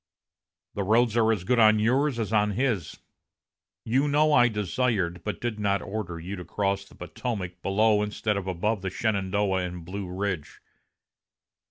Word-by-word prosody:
The 100 - -3
roads 110 +3 +3
are 115 -1 +4
as 105 -5 -1
good 125 +5 +2
on 110 -1 +6
yours 130 +5 +2
as 110 -2 -2
on 105 -1 +2
his. 115 - -1 0.9
You 130 +6 +2
know 150 +1 +3
I 120 -4 +6
desired, 105 -4 -1
but 105 - -4
did 120 -3 -3
not 100 -2 0
order, 95 -5 -5
you 90 +4 -6
to 90 - -6
cross 100 +1 -1
the - - -18
Potomac 90 -1 -5
below 105 +2 +3
instead 105 0 -1
of 100 -1 -4
above 95 +3 -1
the 95 - -2
Shenandoah 100 -1 0
and 90 -2 -6
Blue 95 +1 -5
Ridge. 95 -5 -4
105 Hz, 165 wpm, -26 LUFS, 95-115 Hz, 0.9 s, on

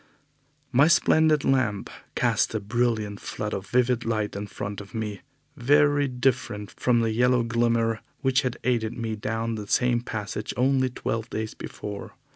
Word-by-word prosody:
My 135 +4 +5
splendid 160 -3 +4
lamp 130 -7 +1 0.3
cast - - +1
a - - +1
brilliant 110 -2 -1
flood 105 0 -4
of 95 0 -4
vivid 125 +1 +2
light 110 -3 -1
in 100 +1 -4
front 100 +1 -5
of 100 +3 -12
me, 105 -2 -4 0.3
very 145 +2 +3
different 125 -5 -1
from 120 -2 +2
the 115 -1 +1
yellow 125 +2 +3
glimmer 115 -1 +1 0.2
which 130 -1 +3
had 125 -2 -2
aided 115 -3 0
me 115 -2 -2
down 115 +2 -2
the 105 -2 -5
same 120 +2 +2
passage 105 -3 -4
only 130 +1 +3
twelve 115 -2 -3
days 110 0 -3
before. 105 -1 -7
115 Hz, 155 wpm, -26 LUFS, 110-125 Hz, 0.3 s, My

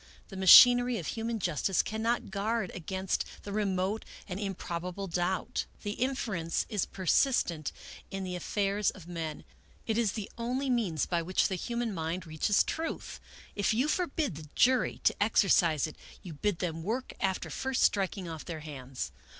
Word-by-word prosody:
The 195 - -9
machinery 245 +6 +8
of 170 - -5
human 230 +4 -2
justice 180 0 +1
cannot 220 0 -1
guard 205 0 -1
against 190 +2 -2 0.2
the 200 - -6
remote 200 0 0 0.2
and 185 -1 -4
im 195 -2 -3
probable 180 +3 -4
doubt. 180 +1 -1 0.2
The 205 - -2
inference 215 -9 -1
is 210 -5 -1
persistent 180 - +1 0.4
in 195 0 -4
the 185 -1 -4
afifairs 200 +3 0
of 185 -5 -12
men. 165 -3 -5 0.4
It 225 0 0
is 215 -5 +1
the 215 -3 -4
only 255 +3 -1
means 195 - +1
by 170 -2 0
which 185 +3 +1
the - - -2
human 235 +4 -2
mind 165 +1 -3
reaches 160 +6 +2
the - - -3
truth. 325 0 -4 0.4
If 205 +1 +1
you 255 +6 +2
forbid 310 - -1
the 155 -2 -10
jury 255 0 +3
to - - +4
exercise 175 -8 +4
it, 155 - -8 0.3
you 175 - -7
bid 195 +5 -1
them 165 -2 -3
work 230 +9 -3
after 190 -1 -1
first 265 -1 0
striking 195 -1 +1
ofT 160 -2 -7
their 165 -3 -5
hands. 135 -4 -6
195 Hz, 165 wpm, -30 LUFS, 170-225 Hz, 0.4 s, machinery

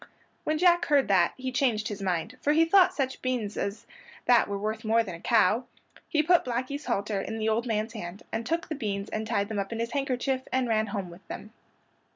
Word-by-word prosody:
When 310 - +1
Jack 350 +1 +4
heard 290 -4 +3
that 180 -3 +3
he 260 0 -4
changed 245 -5 +1
his 205 -1 -5
mind, 185 +4 -1
for 295 - +2
he 325 +2 +5
thought 365 +1 +6
such 270 -7 -2
beans 245 -5 -2
as 200 +2 -3 0.4
that 245 -1 +5
were 200 - -2
worth 215 +2 -3
more 225 +1 +3
than 190 -5 -6
a 170 - -8
cow. 230 +1 +3 0.4
He 305 -2 +2
put 350 +2 +4
Blackey's 255 +4 -3
halter 205 -3 -1
in 220 +3 -5
the 220 0 -1
old 230 +3 0
man's 220 0 -1
hand, 185 -3 -7
and 225 - -2
took 330 +5 -1
the 320 - -3
beans 205 -7 -3
and 215 0 -3
tied 200 -3 0
them 215 -1 -3
up 195 +2 -3
in 230 - -3
his 230 0 -2
handkerchief 265 -1 -1
and 260 -1 +1
ran 220 -1 +1
home 200 -3 -4
with 175 +3 -15
them. 215 - -8
230 Hz, 225 wpm, -28 LUFS, 205-265 Hz, 0.4 s, thought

